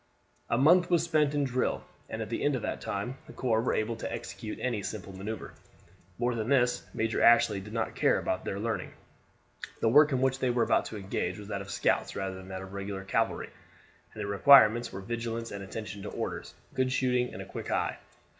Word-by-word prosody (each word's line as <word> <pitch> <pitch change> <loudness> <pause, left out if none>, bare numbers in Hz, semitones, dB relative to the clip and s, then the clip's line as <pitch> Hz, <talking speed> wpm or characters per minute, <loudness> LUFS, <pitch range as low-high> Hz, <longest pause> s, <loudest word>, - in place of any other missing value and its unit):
A 115 - +2
month 175 +7 +5
was 170 -2 +3
spent 150 -3 +2
in 145 - +2
drill, 130 -1 0 0.3
and 110 0 -3
at 105 - -8
the - - -2
end 145 -1 +2
of 120 - -4
that - - -3
time 110 +7 -4
the 155 - -11
corps 115 -3 +1
were 120 - 0
able 110 +2 -1
to - - -5
execute 110 - -6
any 120 -5 -1
simple 100 -1 -6
maneuver. 105 +4 -6 0.6
More 120 +1 +1
than 115 0 -3
this 125 -3 +3
Major 115 0 -1
Ashley 115 -3 +5
did 100 +2 -10
not 115 0 -2
care - - +3
about 90 - -2
their 95 - -3
learning. 110 0 -3 0.9
The 115 - +3
work 150 +5 +6
in 130 - +1
which 130 0 +1
they 130 - +1
were 120 -1 +2
about - - +2
to 110 - -6
engage 95 -2 -3
was 105 0 -9
that 100 - -3
of 100 - -9
scouts - - 0
rather 95 -1 -3
than 95 0 -10
that 95 0 -6
of 95 0 -10
regular 100 -1 -5
cavalry, 95 - -1 0.6
and - - -4
the - - -3
requirements 115 +2 +6
were 95 - -6
vigilance 115 +2 -4
and 100 -1 -6
attention 100 0 -6
to 105 - -5
orders, - - -5 0.2
good 130 0 +1
shooting 125 -1 +1
and - - -7
a - - -11
quick - - -7
eye. - - -1
115 Hz, 220 wpm, -29 LUFS, 100-130 Hz, 0.9 s, work